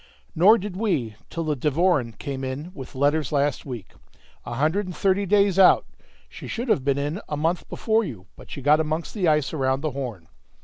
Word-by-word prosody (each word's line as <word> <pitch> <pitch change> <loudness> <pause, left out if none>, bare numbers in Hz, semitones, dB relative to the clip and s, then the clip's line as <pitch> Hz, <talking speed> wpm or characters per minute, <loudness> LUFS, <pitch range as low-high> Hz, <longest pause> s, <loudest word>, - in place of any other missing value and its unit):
"Nor 200 +8 +6
did 195 -2 -6
we 165 - -1
till 165 - -3
the 155 -2 -1
Devoren 145 -3 +1
came 135 -1 -5
in 135 +6 -5
with 135 -5 -10
letters 145 +1 +1
last 145 -1 0
week, 120 -7 -7 0.5
a 120 - -4
hundred 160 +9 +1
and 180 - -6
thirty 195 +3 +1
days 200 -1 +3
out. 190 - +6 0.4
She - - -10
should 240 +1 -4
have 140 - +2
been 140 0 +1
in 145 +8 -2
a 150 - -2
month 165 +4 -1
before 225 0 +1
you, 110 - -7
but - - -15
she 140 - -7
got 150 +2 +5
amongst 160 +1 -2
the 195 -5 0
ice 150 -2 +2
around 135 -2 0
the 155 -1 -2
Horn. 120 -11 -6
150 Hz, 205 wpm, -24 LUFS, 135-185 Hz, 0.5 s, Nor